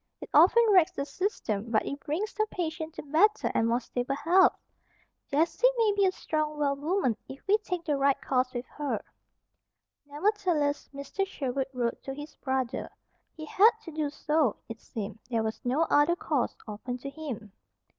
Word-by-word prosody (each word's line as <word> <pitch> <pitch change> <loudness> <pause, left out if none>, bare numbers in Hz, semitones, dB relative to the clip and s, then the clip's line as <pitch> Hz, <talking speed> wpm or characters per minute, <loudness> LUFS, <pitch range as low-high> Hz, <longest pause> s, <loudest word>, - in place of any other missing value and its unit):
It - - -10
often 370 +10 +7
wracks 365 -5 +5
the 280 - -3
system, 260 - -2
but 220 -2 +2
it 280 - -4
brings 355 +10 -3
the 430 0 0
patient 320 -2 -4
to - - -6
better 360 +9 +3
and 225 - +2
more 235 +1 +2
stable 250 +2 -3
health. 355 +6 +4 0.7
Jessie 325 - +3
may 455 -2 +4
yet 410 - +1
be 400 -1 +3
a - - +2
strong, 305 -4 -2
well 285 -1 +1
woman 295 - 0
if 265 - -10
we 415 +2 +4
take 360 -5 -4
the 295 -3 +1
right 275 0 +2
course 255 -1 0
with 245 0 -4
her." 295 -1 -4 1.0
Nevertheless, 310 -2 0
Mr. 280 +7 -3
Sherwood 270 -6 -2
wrote 245 -3 -2
to 270 - -6
his 295 +1 -8
brother. 260 -2 -2 0.5
He 310 - -6
had 405 +8 +6
to 330 - -8
do 305 -1 -1
so, 300 -4 +1
it 225 0 -8
seemed. 215 0 -6
There 230 -2 0
was 220 0 -3
no 265 +6 +2
other 310 +2 +3
course 295 -6 -1
open 220 +4 -5
to 275 +2 -7
him. 260 -10 -7
290 Hz, 180 wpm, -28 LUFS, 255-345 Hz, 1.0 s, often